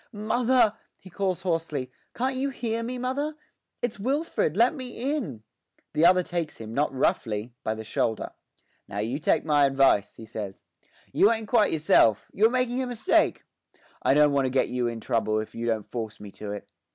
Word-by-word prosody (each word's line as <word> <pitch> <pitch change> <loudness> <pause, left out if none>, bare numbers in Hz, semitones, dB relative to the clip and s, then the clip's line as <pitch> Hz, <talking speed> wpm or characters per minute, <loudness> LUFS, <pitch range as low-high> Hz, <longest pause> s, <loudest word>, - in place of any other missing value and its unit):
'Mother!' 230 +1 +2 0.2
he 185 - -15
calls 190 -1 -1
hoarsely. 160 -7 -2 0.2
'Can't 260 +2 -1
you 270 +2 -1
hear 230 -3 -3
me, 245 +2 -4
mother? 275 +5 -2 0.5
It's 235 -4 -2
Wilfred; 265 - 0
let 240 +5 +5
me 260 0 -4
in!' 140 - -5 0.5
The 155 +2 +5
other 180 0 +5
takes 170 -3 -4
him, 110 0 -8
not 145 +4 +1
roughly, 115 -3 -1
by 110 - -1
the 110 - -7
shoulder. 110 0 -1 0.6
'Now 100 - -7
you 115 +7 -2
take 155 - +1
my 145 -2 +4
advice,' 135 -7 +3
he 115 - -10
says. 105 -3 -7 0.5
'You 205 - +5
ain't 220 -1 -2
quite 220 -2 +3
yourself; 130 -9 +3
you're 220 +3 +4
making 250 0 0
a 255 - -2
mistake. 245 - +1 0.6
I 135 - +3
don't 150 -1 +5
want 140 -1 +2
to - - -1
get 130 +1 +1
you 125 -1 0
in 115 -1 -4
trouble 110 -1 0
if 110 - -6
you 115 0 -4
don't 110 -3 0
force 110 -2 -5
me 105 -1 -9
to 105 +1 -7
it. 105 -1 -7
160 Hz, 190 wpm, -26 LUFS, -, 0.6 s, let